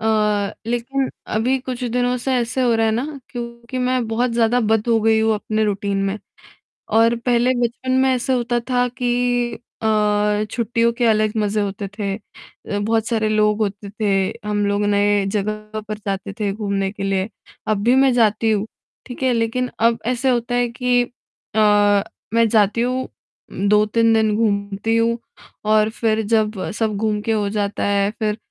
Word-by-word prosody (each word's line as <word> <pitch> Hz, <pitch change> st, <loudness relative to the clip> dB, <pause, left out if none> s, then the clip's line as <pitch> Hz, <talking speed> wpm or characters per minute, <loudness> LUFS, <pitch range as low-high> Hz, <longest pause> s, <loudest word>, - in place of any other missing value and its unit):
अ, 210 Hz, -2 st, +1 dB
लेक़िन 250 Hz, +3 st, -1 dB, 0.3 s
अभी 255 Hz, +5 st, +1 dB
कुछ 255 Hz, 0 st, -6 dB
दिनों 245 Hz, +1 st, 0 dB
से 265 Hz, -, +1 dB
ऐसे 245 Hz, +2 st, -1 dB
हो 240 Hz, -2 st, +3 dB
रहा 225 Hz, 0 st, +2 dB
है 220 Hz, -, +2 dB
ना 275 Hz, +5 st, -3 dB
क्योंकि 235 Hz, +1 st, -6 dB
मैं 255 Hz, -2 st, 0 dB
बहुत 240 Hz, +2 st, 0 dB
ज़्यादा 235 Hz, +1 st, +2 dB
बँध 220 Hz, +1 st, +1 dB
हो 230 Hz, -1 st, +3 dB
गई 220 Hz, 0 st, +3 dB
हूँ 220 Hz, 0 st, +2 dB
अपने 215 Hz, +1 st, -1 dB
रूटीन 200 Hz, -1 st, -1 dB
में 195 Hz, +2 st, -2 dB, 0.8 s
और 230 Hz, +1 st, +4 dB
पहले 245 Hz, +1 st, +3 dB
बचपन 240 Hz, +2 st, -2 dB
में 265 Hz, -, +3 dB
ऐसा 255 Hz, +1 st, 0 dB
होता 240 Hz, -1 st, 0 dB
था 250 Hz, 0 st, +2 dB
कि 245 Hz, 0 st, +1 dB, 0.3 s
अ, 210 Hz, -1 st, +2 dB
छुट्टियों 235 Hz, 0 st, +1 dB
के 245 Hz, -, +2 dB
अलग 215 Hz, -1 st, +3 dB
मज़े 210 Hz, 0 st, 0 dB
होते 200 Hz, 0 st, -3 dB
थे 200 Hz, -2 st, -2 dB
अ, 205 Hz, -1 st, -8 dB
बहुत 225 Hz, +1 st, 0 dB
सारे 220 Hz, -2 st, 0 dB
लोग 210 Hz, 0 st, +2 dB
होते 200 Hz, 0 st, -3 dB
थे 200 Hz, -2 st, 0 dB
हम 205 Hz, -1 st, 0 dB
लोग 205 Hz, +1 st, 0 dB
नए 205 Hz, -1 st, +2 dB
जगह 215 Hz, +1 st, -3 dB
पर 215 Hz, 0 st, -4 dB
जाते 195 Hz, 0 st, -3 dB
थे 205 Hz, -2 st, 0 dB
घूमने 200 Hz, -2 st, -2 dB
के 200 Hz, -1 st, -7 dB
लिए। 195 Hz, +1 st, 0 dB, 0.4 s
अब 210 Hz, -2 st, 0 dB
भी 240 Hz, +3 st, +4 dB
मैं 270 Hz, 0 st, +5 dB
जाती 225 Hz, -1 st, +2 dB
हूँ 210 Hz, 0 st, 0 dB, 0.4 s
ठीक 250 Hz, +1 st, -7 dB
है, 260 Hz, -, +3 dB
लेक़िन 235 Hz, +2 st, 0 dB
अब 230 Hz, 0 st, +3 dB
ऐसा 255 Hz, +1 st, +1 dB
होता 240 Hz, 0 st, -1 dB
है 245 Hz, 0 st, +2 dB
कि 245 Hz, 0 st, +1 dB, 0.5 s
अ, 205 Hz, -2 st, +4 dB, 0.3 s
मैं 230 Hz, 0 st, +4 dB
जाती 215 Hz, +1 st, +3 dB
हूँ 255 Hz, +2 st, -1 dB, 0.6 s
2-3 215 Hz, +2 st, +3 dB
दिन 220 Hz, -1 st, +2 dB
घूमती 205 Hz, 0 st, 0 dB
हूँ 230 Hz, +1 st, +2 dB, 0.5 s
और 215 Hz, 0 st, +4 dB
फ़िर 220 Hz, -1 st, 0 dB
जब 215 Hz, -1 st, +2 dB, 0.2 s
सब 220 Hz, -1 st, -1 dB
घूम 215 Hz, -1 st, 0 dB
के 225 Hz, -, -2 dB
हो 210 Hz, -2 st, +1 dB
जाता 205 Hz, -1 st, -2 dB
है 200 Hz, 0 st, +2 dB
फ़िर 215 Hz, -1 st, 0 dB
220 Hz, 175 wpm, -20 LUFS, 210-240 Hz, 0.8 s, मैं